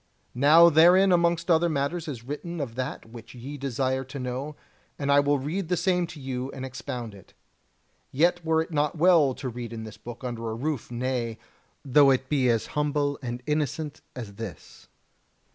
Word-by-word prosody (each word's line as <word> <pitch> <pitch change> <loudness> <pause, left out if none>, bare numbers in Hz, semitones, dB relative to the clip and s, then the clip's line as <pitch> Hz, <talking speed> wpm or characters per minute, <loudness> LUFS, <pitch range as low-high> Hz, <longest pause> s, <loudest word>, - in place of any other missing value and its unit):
Now 155 +6 +7
herein 180 +5 +6
amongst 170 0 +2
other 170 +1 +4
matters 155 +3 -2
is 125 -6 -6
written 155 +6 -6
of 135 -6 -4
that 125 -2 -5
which 115 +1 -11
ye 130 +4 -7
desire 130 -1 -1
to 135 +2 -8
know, 130 +3 -4 0.4
and 140 -1 -1
I 140 - +6
will 145 0 +2
read 160 +7 -3
the 180 - +1
same 180 0 +1
to 160 -2 -10
you 130 -1 -4
and 130 - -6
expound 125 -3 -6
it. 100 -2 -16 0.8
Yet 175 +5 +2
were 160 0 +2
it 165 - -14
not 150 +1 0
well 160 -6 +4
to 135 - -6
read 120 -1 -6
in 115 -1 -6
this 110 -1 -9
book 120 +3 -10
under 115 -2 -4
a 110 - -3
roof, 140 +1 -3
nay, 120 -2 -2 0.5
though 140 +1 +6
it 130 0 +1
be 135 -4 +2
as 115 -2 +1
humble 145 -1 0
and 120 -1 -5
innocent 150 0 -2
as 115 -5 -7
this. 105 -9 -9
140 Hz, 185 wpm, -26 LUFS, 125-160 Hz, 0.8 s, Now